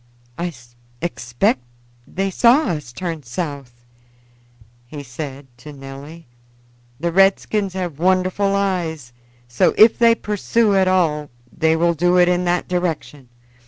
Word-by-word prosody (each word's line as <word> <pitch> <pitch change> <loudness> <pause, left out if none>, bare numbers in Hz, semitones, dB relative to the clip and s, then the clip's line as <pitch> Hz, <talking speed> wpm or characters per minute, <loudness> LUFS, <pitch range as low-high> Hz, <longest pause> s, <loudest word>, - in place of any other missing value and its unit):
"I 175 +1 -3 0.5
expect 120 -6 0 0.5
they 195 +1 -2
saw 245 - +4
us 150 -8 -4
turn 165 +3 -5
south," 135 -3 -6 1.0
he 145 +3 -8
said 135 +2 -7
to 150 +4 -10
Nelly. 140 +4 -11 0.7
"The 170 +2 -1
redskins 195 +2 +2
have 175 -6 -4
wonderful 185 +2 +1
eyes; 170 -10 -2 0.3
so, 120 0 +1
if 220 +1 +6
they 230 -1 +5
pursue 210 +1 0
at 190 -1 +3
all, 155 -6 +1 0.3
they 160 -1 +2
will 170 +1 +2
do 175 +3 +2
it 180 0 +5
in 180 0 +1
that 175 0 0
direction. 165 -7 -3
170 Hz, 125 wpm, -20 LUFS, 145-185 Hz, 1.0 s, if